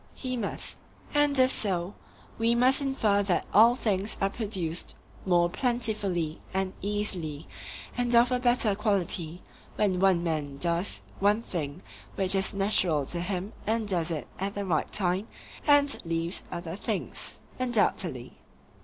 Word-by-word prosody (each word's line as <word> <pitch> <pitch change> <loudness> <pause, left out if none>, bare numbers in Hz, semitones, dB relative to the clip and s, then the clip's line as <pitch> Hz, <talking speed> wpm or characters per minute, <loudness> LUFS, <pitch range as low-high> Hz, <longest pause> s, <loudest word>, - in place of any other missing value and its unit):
He 255 -2 -4
must. 225 -5 -1 0.3
And 290 -1 +3
if 260 0 +5
so, 185 -2 +1 0.5
we 230 +1 +3
must 255 +4 +4
infer 225 -7 +1
that 195 -3 0
all 230 +3 +7
things 205 -4 0
are 195 0 +1
produced 190 -8 -2 0.3
more 175 -1 +4
plentifully 205 - 0 0.2
and 190 -1 0
easily 185 -7 -2 0.5
and 245 -1 +1
of 240 +2 +5
a 250 - +1
better 240 -4 +3
quality 185 -5 0 0.3
when 190 -4 +1
one 185 -3 +3
man 150 -4 -2
does 170 +4 -1 0.2
one 205 +3 +2
thing 155 -3 -4 0.3
which 190 -1 +2
is 195 0 +1
natural 185 -7 +1
to 170 +5 0
him 185 +2 -3
and 220 0 0
does 175 -4 0
it 160 -3 -3
at 195 +2 -3
the 200 0 -3
right 165 -5 0
time, 190 +2 0 0.4
and 285 -1 +4
leaves 165 +1 -2
other 170 -1 -5
things. - - -4 0.2
Undoubtedly. 245 -4 0
195 Hz, 145 wpm, -28 LUFS, 175-230 Hz, 0.5 s, all